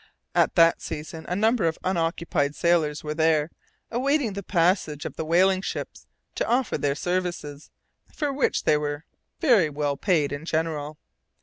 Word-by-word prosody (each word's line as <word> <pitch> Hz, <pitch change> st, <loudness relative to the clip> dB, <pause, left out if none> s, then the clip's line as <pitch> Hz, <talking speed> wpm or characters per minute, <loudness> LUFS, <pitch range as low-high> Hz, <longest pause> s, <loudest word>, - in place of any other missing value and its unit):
At -, -, +2 dB
that 165 Hz, -1 st, +5 dB
season 160 Hz, +1 st, -7 dB
a 180 Hz, -, -2 dB
number 220 Hz, -2 st, +2 dB
of 160 Hz, -, -1 dB
unoccupied 165 Hz, -4 st, 0 dB
sailors 160 Hz, -3 st, +1 dB
were 150 Hz, 0 st, -3 dB
there, 160 Hz, 0 st, +2 dB, 0.4 s
awaiting 260 Hz, -1 st, +1 dB
the 200 Hz, -, -4 dB
passing 175 Hz, -4 st, +1 dB
of -, -, -5 dB
the -, -, -3 dB
whaling 185 Hz, +4 st, +3 dB
ships -, -, -6 dB, 0.3 s
to -, -, -2 dB
offer 245 Hz, 0 st, +1 dB
their 140 Hz, -1 st, 0 dB
services, 175 Hz, -4 st, -3 dB, 0.4 s
for 290 Hz, -2 st, -2 dB
which 270 Hz, -, 0 dB
they 150 Hz, -, +3 dB
were 145 Hz, +1 st, -4 dB, 0.3 s
very 230 Hz, -, +4 dB
well 145 Hz, -1 st, -2 dB
paid 160 Hz, -5 st, +1 dB
in 145 Hz, +1 st, -5 dB
general. 155 Hz, -2 st, -2 dB
165 Hz, 160 wpm, -25 LUFS, 150-190 Hz, 0.4 s, that